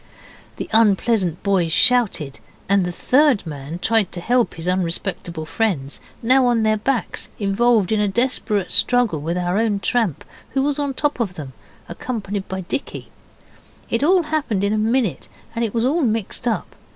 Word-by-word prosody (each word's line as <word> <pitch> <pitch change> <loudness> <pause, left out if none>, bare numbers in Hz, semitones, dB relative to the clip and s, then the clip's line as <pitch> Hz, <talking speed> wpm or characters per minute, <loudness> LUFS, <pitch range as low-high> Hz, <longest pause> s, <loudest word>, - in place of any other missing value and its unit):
The - - -5
unpleasant 205 -5 +2
boys 190 -5 +1
shouted, 210 - +2 0.3
and 200 -1 +3
the 180 - -2
third 260 - +2
man 145 +1 -6
tried 215 0 +1
to 175 - -3
help 240 +6 +1
his 165 +1 -6
unrespectable 175 -2 -2
friends, 155 -9 -2 0.2
now 255 +2 +4
on 235 -2 +2
their 215 0 +2
backs 245 +3 -2
involved 215 0 +2
in 215 - +2
a 210 - +2
desperate 210 -3 0
struggle 240 -11 +3
with 170 +4 -2
our 180 +3 0
own 220 -3 +1
tramp, 210 - 0 0.3
who 270 - +2
was 290 0 -1
on 285 -2 -2
top 295 -1 -1
of 200 -6 -2
them, 140 -5 -8 0.3
accompanied 200 0 -5
by 190 0 -4
Dicky. 190 - -5 0.8
It 230 - +1
all 360 +3 +4
happened 295 -11 -1
in 200 +1 +1
a - - +1
minute, 225 -2 0 0.3
and 230 - -1
it 225 - -1
was 230 +1 0
all 310 +6 +1
mixed 225 -1 -1
up. 225 - -2
215 Hz, 170 wpm, -21 LUFS, 180-245 Hz, 0.8 s, now